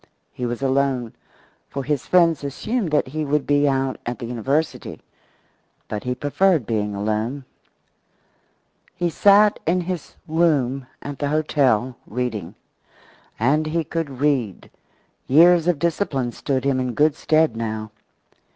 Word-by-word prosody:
He 125 - -3
was 120 +3 -4
alone, 135 -3 0 0.6
for 140 - -4
his 145 -1 -2
friends 170 -4 +3
assumed 205 - -2
that 150 -3 +1
he 155 +3 -3
would 150 0 0
be 145 0 +3
out 135 -1 -1
at 120 0 -4
the 120 - -6
university. 135 +7 -2 0.9
But 105 - -5
he 125 0 -1
preferred 155 - +1
being 105 -2 -2
alone. 110 +7 -2 1.5
He 175 -1 -1
sat 205 +4 +5
in 180 +2 +2
his 175 -2 -5
room 140 -6 +1 0.2
at 145 -1 -6
the 145 - -1
hotel, 135 -6 +1
reading. 110 -6 -4 0.8
And 150 +7 +2
he 165 +1 0
could 150 -4 -4
read. 130 -9 -1 0.6
Years 170 +4 +6
of 175 -3 +2
discipline 145 -6 -1
stood 130 +1 -2
him 135 -2 +1
in 125 -2 -2
good 150 0 +3
stead 155 -6 +2
now. 110 -1 -4
140 Hz, 135 wpm, -22 LUFS, 125-160 Hz, 1.5 s, Years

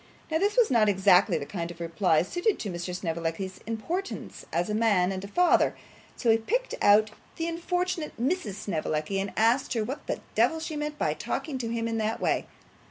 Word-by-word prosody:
Now 320 - +2
this 410 +5 +1
was 480 -3 +5
not 220 -4 +4
exactly 190 -2 +4
the 145 - -4
kind 170 0 -4
of 170 0 -10
reply 170 0 +2
suited 355 - 0
to 205 - -4
Mr. 175 +1 -4
Snevellicci's 170 +2 -3
importance 330 - -4
as 175 - 0
a 210 - -2
man 205 -5 +3
and 190 0 -4
a - - -5
father, 355 - +3 0.4
so 235 - +2
he 225 - +5
picked - - -1
out 210 +1 +5 0.2
the 330 - -2
unfortunate 340 -2 -2
Mrs 250 - -1
Snevellicci, 165 -2 -2
and 195 0 -2
asked 230 +6 +3
her 225 -3 0
what 265 +7 -6
the - - -2
devil 320 - +3
she 315 -1 -5
meant 300 0 -3
by - - +1
talking 285 -5 -4
to 230 -2 -3
him 230 0 -1
in 225 -1 -1
that 220 +1 -1
way. - - 0
220 Hz, 200 wpm, -27 LUFS, 185-305 Hz, 0.4 s, was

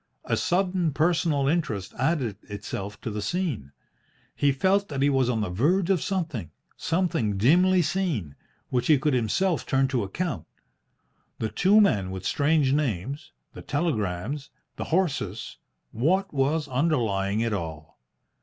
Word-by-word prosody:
A - - +1
sudden 180 -3 +1
personal 155 -2 +2
interest 135 - -1
added 130 - 0
itself 100 0 -6
to 115 - -4
the 105 0 -3
scene. 130 - -2 0.6
He 145 - +3
felt 195 +8 +2
that 140 -2 -2
he 145 - +4
was 130 -2 +2
on 115 -3 0
the 105 - -2
verge 170 - +2
of 185 - +2
something 160 - -2 0.3
something 165 - 0
dimly 180 - +4
seen 150 - -2 0.3
which 125 -2 0
he 155 - +6
could 145 +2 0
himself 150 - +1
turn 135 0 +2
to 130 -3 0
account. 115 - -3 0.9
The 110 - -2
two 195 - +4
men 105 - +3
with 95 0 -6
strange 145 -2 +2
names, 140 - -2 0.2
the - - -9
telegrams, 135 - -2 0.3
the - - -4
horses 145 - -1 0.3
what 180 - +1
was 145 +3 +1
underlying 115 -8 0
it 115 -1 0
all? 80 -5 -6
140 Hz, 145 wpm, -26 LUFS, 105-170 Hz, 0.9 s, he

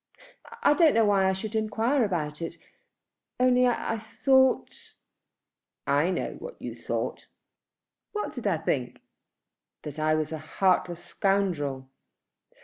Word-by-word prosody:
"I - - +6
don't 320 -3 +4
know 225 -1 +5
why 195 -2 +3
I - - +1
should 210 +3 -5
enquire 225 +5 +1
about 155 -6 -2
it, 165 0 -5 0.8
only 250 0 +4
I 225 -2 -1
thought 265 +4 +1 0.4
" - - -62 0.2
"I 170 - +1
know 185 - -3
what - - -9
you - - -6
thought." - - -4 0.8
"What 420 - -3
did 245 -4 -4
I 185 -5 +2
think?" 130 -5 -2 0.8
"That 150 0 -7
I 155 0 +2
was 155 0 -2
a 160 - -4
heartless 175 +1 0
scoundrel." 165 -10 -1
195 Hz, 135 wpm, -27 LUFS, 155-235 Hz, 0.8 s, I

